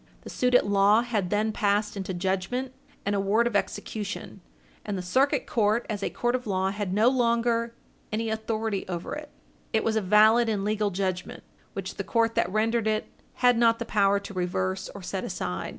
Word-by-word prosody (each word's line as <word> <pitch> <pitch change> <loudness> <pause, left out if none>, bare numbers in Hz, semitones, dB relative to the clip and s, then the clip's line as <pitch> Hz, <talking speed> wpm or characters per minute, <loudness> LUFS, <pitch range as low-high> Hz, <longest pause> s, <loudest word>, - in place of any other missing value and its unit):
The - - -9
suit 250 0 +1
at - - +5
law 205 +3 +4
had 215 -7 -1
then 215 +2 +1
passed 210 0 0
into 195 -1 -4
judgment 190 +8 -2 0.3
and 200 - 0
award 200 +4 +2
of 240 - -1
execution, 210 -2 -3 0.4
and 200 - -3
the 180 - -4
Circuit 270 - +2
Court, 220 +1 +1
as 205 -1 -3
a - - -1
court 240 0 -1
of 250 -2 -2
law, 190 -1 0
had 205 -2 -3
no 210 +4 +3
longer 235 -2 +1 0.4
any 220 +1 -1
authority 220 -2 -2
over 175 -2 -4
it. 300 0 -7 0.4
It 220 - +2
was 225 - 0
a 220 - +2
valid 215 +4 +5
and 205 -2 -1
legal 210 0 +1
judgment, 185 -1 -3 0.3
which - - -6
the - - -2
court 230 -2 +1
that 175 - +1
rendered 220 +2 +1
it 215 0 -1 0.4
had 245 -2 +5
not 230 -1 +4
the 235 - -4
power 200 -2 +2
to 200 - -9
reverse 135 - -2
or - - -8
set - - -4
aside. - - -4
215 Hz, 195 wpm, -27 LUFS, 195-230 Hz, 0.4 s, at